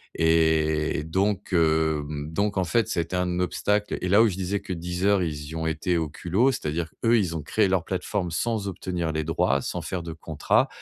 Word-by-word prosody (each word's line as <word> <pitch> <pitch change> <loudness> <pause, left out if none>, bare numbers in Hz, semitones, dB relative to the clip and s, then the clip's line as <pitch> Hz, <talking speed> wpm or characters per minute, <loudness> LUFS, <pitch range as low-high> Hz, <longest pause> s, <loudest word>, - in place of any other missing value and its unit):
et 80 -2 +2
donc, 95 +4 -1
hem, 80 -2 +1
donc 100 +3 0
en 95 - +2
fait, 105 +6 +1
ça 85 - -1
a - - +2
été 85 +3 -6
un 90 -1 0
obstacle. 105 +4 0
Et 90 - -1
là, 105 +4 +6
où - - +5
je 90 - -4
disais 95 +2 -1
que 100 -2 -5
Deezer, 90 +3 +1
ils 75 -3 -4
y 80 - -7
ont 80 0 -2
été 85 +2 0
au 80 -2 -1
culot, 95 - +1
c'est-à-dire, 80 - -3 0.2
eux 115 - +5
ils 90 -5 -1
ont - - -4
créé 105 +5 +2
leur 95 -2 +1
plateforme 95 -1 -2
sans 110 +3 -1
obtenir 90 -3 -3
les 80 0 -1
droits, 70 -3 +1
sans - - -4
faire 95 - -3
de 85 -1 -6
contrat. 80 -2 +1
85 Hz, 215 wpm, -25 LUFS, 80-95 Hz, 0.2 s, là